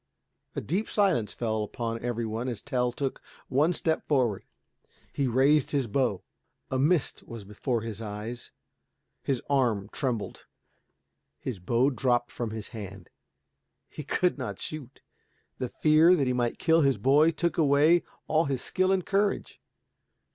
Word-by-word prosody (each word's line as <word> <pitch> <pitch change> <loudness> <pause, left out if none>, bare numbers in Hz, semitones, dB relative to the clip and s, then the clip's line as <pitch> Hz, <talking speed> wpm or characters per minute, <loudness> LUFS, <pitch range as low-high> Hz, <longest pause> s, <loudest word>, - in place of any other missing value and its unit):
A - - -2
deep 190 +8 -2
silence 185 - +2
fell 110 -2 -2
upon 115 +2 -4
every 120 -1 -2
one 110 +3 -3
as 120 -4 -4
Tell 125 -3 0
took 135 +1 -3 0.3
one 145 +6 +3
step 160 -2 -1
forward. 125 -9 +1 0.7
He 140 - 0
raised 135 +4 +3
his 140 -3 0
bow. 115 -4 0 0.5
A 130 - 0
mist 155 +2 +1
was 115 -3 -8
before 110 +4 -2
his 110 -1 -6
eyes, 110 +3 -6 0.7
his 135 -3 -2
arm 120 -8 +1
trembled, 125 -6 -3 0.9
his 125 -8 -5
bow 120 +9 +2
dropped 120 -2 +1
from 120 -2 -4
his 110 -1 -6
hand. 100 -5 -9 0.8
He 150 - -8
could 180 +5 0
not - - -4
shoot. 155 -5 -8 0.6
The 125 -2 -2
fear 155 +6 +5
that 145 -6 +1
he 125 - +1
might 120 -1 -1
kill 165 -1 +3
his 135 -3 +3
boy 145 +5 +4
took 170 +1 -1
away 155 +3 +5 0.3
all 160 +1 +2
his 135 -3 -2
skill 185 0 +1
and 190 -2 +1
courage. 200 +1 -1
130 Hz, 150 wpm, -28 LUFS, 115-155 Hz, 0.9 s, fear